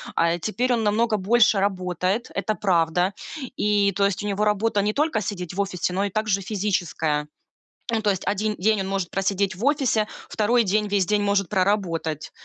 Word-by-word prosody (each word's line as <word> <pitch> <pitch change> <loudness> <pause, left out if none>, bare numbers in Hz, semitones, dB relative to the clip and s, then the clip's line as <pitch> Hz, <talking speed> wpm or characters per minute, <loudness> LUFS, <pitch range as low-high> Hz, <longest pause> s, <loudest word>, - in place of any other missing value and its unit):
А, 170 0 +3
э, 175 - -7
теперь 240 +7 0
он 230 - 0
намного 215 +1 +2
больше 215 +1 +3
работает. 185 +2 -1
Это 200 +2 -1
правда. 175 0 +1 0.4
И 205 -4 +2
то 200 0 +2
есть 200 0 -1
у - - -3
него 205 +1 -1
работа 210 0 +1
не 210 +1 0
только 295 -5 +1
сидеть 180 -4 -5
в 200 - 0
офисе, 180 -2 -2
но 195 +2 0
и - - -2
также 210 -1 0
физическая. 180 -7 -1 0.6
Ну, 225 -1 0
то 210 - +1
есть 190 -1 -3
1 210 +1 0
день 215 +3 +1
он 190 - -3
может 195 -2 -2
просидеть 195 0 0
в 205 +7 -4
офисе, 265 -7 +2 0.2
2 230 +3 +2
день 210 +1 +1
весь 200 -2 +1
день 210 +2 +1
может 200 -2 +1
проработать. 185 -6 -1
200 Hz, 195 wpm, -24 LUFS, 185-215 Hz, 0.6 s, А